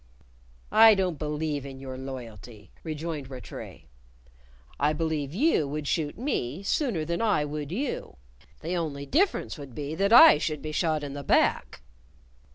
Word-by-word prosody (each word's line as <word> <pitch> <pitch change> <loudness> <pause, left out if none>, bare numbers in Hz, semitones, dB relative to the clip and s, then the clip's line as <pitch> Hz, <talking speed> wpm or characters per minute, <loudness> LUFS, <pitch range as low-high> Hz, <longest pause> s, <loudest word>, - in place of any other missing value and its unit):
"I 220 0 +8
don't 185 -5 -1
believe 150 -1 -2
in 135 -1 -9
your 130 -1 -7
loyalty," 120 -6 -9
rejoined 155 -3 -5
Rattray. 130 -2 -9 1.0
"I 150 +2 +2
believe 155 -3 -2
you 205 - +2
would 150 +1 -4
shoot 150 -2 -1
me 195 - -3
sooner 200 - 0
than 170 +5 -2
I 205 -10 +2
would 150 0 -5
you. 255 +9 -4 0.4
The 170 +3 -3
only 150 -5 -3
difference 335 - 0
would 140 -4 -10
be 145 0 -4
than 195 +5 0
I 230 -10 +9
should 155 -2 -3
be 155 - -4
shot 155 -1 0
in 140 -1 -5
the 145 - -6
back!" 60 - +1
150 Hz, 155 wpm, -27 LUFS, 140-175 Hz, 1.0 s, I